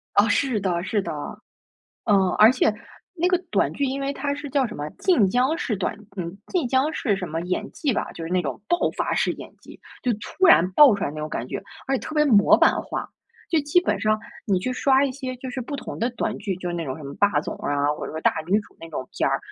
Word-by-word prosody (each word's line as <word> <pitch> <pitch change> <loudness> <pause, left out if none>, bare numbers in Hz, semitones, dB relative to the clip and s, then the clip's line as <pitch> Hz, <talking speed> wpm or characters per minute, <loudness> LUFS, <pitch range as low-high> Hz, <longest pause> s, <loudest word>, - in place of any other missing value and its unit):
哦， 205 +2 +5
是 245 +1 +1
的 180 -3 -1
是 205 +2 0
的， - - -5 0.9
嗯。 210 - +4 0.2
而 215 +3 +8
且 255 -4 +2 0.4
那 355 +1 +1
个 360 - +3
短 - - +1
剧 280 - -1
因 270 +1 -2
为 275 0 -1
它 280 0 -2
是 290 0 -7
叫 270 -1 +2
什 220 - -8
么 145 +1 -4
晋 245 - +3
江 255 +9 +2
式 245 -10 -2
短 195 +2 -2 0.2
嗯， 175 0 -5
晋 340 -9 0
江 265 +5 +2
式 215 -9 0
什 185 -2 -5
么 160 +2 -3
演 180 +1 -3
技 285 -5 -1
吧， - - -3
就 165 - -7
是 165 - -6
那 185 0 +2
种 135 +2 -4
爆 345 - +2 0.2
发 - - 0
式 - - +1
演 - - -10
技。 - - -14 0.2
就 250 - +1
突 295 - 0
然 185 - +6
爆 275 +2 +8
出 200 - -4
来 - - -2
那 155 - -10
种 155 0 -4
感 120 - -4
觉， - - -4 0.2
而 270 - +1
且 - - -3
特 310 - -7
别 300 -1 +4
模 210 -8 +6
版 - - +4
化。 - - -5 0.4
就 325 -3 +2
基 295 +5 +3
本 360 - -1
上 215 0 +2 0.3
你 200 -7 +2
去 255 +8 -2
刷 265 +1 +3
一 275 - -1
些 255 -1 -5
就 260 +1 -7
是 255 +1 -4
不 285 +4 -5
同 - - -7
的 235 +2 +1
短 240 - -3
剧， 195 -4 -3
就 180 -1 -5
是 175 - -3
那 170 -1 -3
种 130 -2 -4
什 155 - -10
么 140 - -7
霸 200 -8 +2
总 - - -5
啊， 145 0 0
或 - - -6
者 - - -6
说 160 - -5
大 - - +3
女 190 +5 +2
主 215 - -11
那 165 - -9
种 130 -4 -5
片 - - +2
儿， 135 - +1
220 Hz, 285 characters per minute, -24 LUFS, 180-275 Hz, 0.9 s, 而